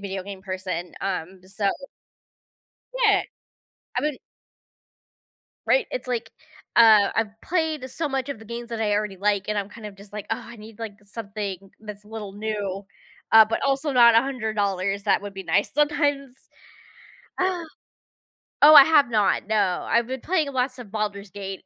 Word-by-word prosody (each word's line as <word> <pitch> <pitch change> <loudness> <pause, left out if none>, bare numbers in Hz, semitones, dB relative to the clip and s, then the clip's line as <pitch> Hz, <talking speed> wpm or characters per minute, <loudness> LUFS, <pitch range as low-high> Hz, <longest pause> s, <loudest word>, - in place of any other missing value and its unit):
video 195 -1 -5
game 195 0 -9
person, 185 -2 -5
um, 185 -1 -4
so 195 +1 -1 1.4
Yeah, 405 -3 +5 0.8
I - - +2
been 300 -2 -2 1.5
Right, - - +3
it's - - -4
like, 235 -2 -3 0.5
uh, 220 -3 +7
I've 220 -1 -2
played 315 -6 -2
so 320 +3 -3
much 270 -1 -2
of 280 - -5
the 220 - -13
games 235 +1 -7
that 230 -1 -5
I 210 -2 +1
already 205 -1 -1
like, 200 0 0
and 210 -1 0
I'm 200 -1 -3
kind 220 +1 -13
of 200 - -10
just 200 0 -15
like, 210 -1 -6
"Oh, 225 - +1
I 235 - -11
need, 220 -1 -13
like, 225 -3 -6
something 200 -2 -6
that's 210 -1 -10
a - - -18
little 215 -3 -7
new," 205 -2 -4 0.5
uh, 220 0 +9
but 220 - -2
also 275 +2 0
not 240 -3 +6
$100, 205 -6 0
that 205 - +2
would 205 -1 -8
be 195 - -6
nice. 200 +1 0
Sometimes 290 -2 +1 1.1
Ah. 370 -1 0 1.0
Oh, 305 - +10
I 285 -3 +11
have 300 -5 +4
not, 210 -3 +2
no, 210 -4 +1
I've 235 0 +2
been 260 0 -5
playing 320 -5 0
lots 255 0 -1
of 235 -4 -10
Baldur's 205 -2 -3
Gate 195 0 -7
215 Hz, 170 wpm, -24 LUFS, 200-260 Hz, 1.5 s, I